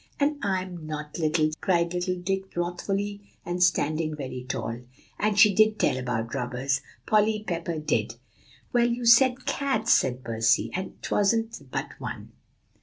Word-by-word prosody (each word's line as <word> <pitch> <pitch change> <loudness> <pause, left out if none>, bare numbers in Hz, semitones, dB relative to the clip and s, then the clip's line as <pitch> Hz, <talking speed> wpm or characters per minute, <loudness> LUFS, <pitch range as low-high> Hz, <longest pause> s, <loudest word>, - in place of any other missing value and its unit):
"And 290 +1 +1
I'm 185 -4 -3
not 150 +1 -6
little," 155 -1 +2
cried 170 -2 +1
little 180 +1 -1
Dick 190 +1 -3
wrathfully, 195 +4 -2 0.2
and 175 +1 -3
standing 155 -3 +2
very 130 -3 -6
tall. 120 -2 -4 0.4
"And 210 -1 +1
she 210 0 +7
did 215 +2 +4
tell - - +2
about 125 -3 -3
robbers 130 +3 -1 0.2
Polly 215 0 +2
Pepper 170 -2 -2
did." 155 - -1 0.6
"Well, 240 -1 +4
you 240 0 -2
said 250 +2 +5
cats," 265 -5 +1
said 125 0 +1
Percy; 115 0 +1
"and 185 +1 -5
'twasn't 225 - 0
but - - -3
one." - - -7
180 Hz, 145 wpm, -26 LUFS, 150-210 Hz, 0.6 s, she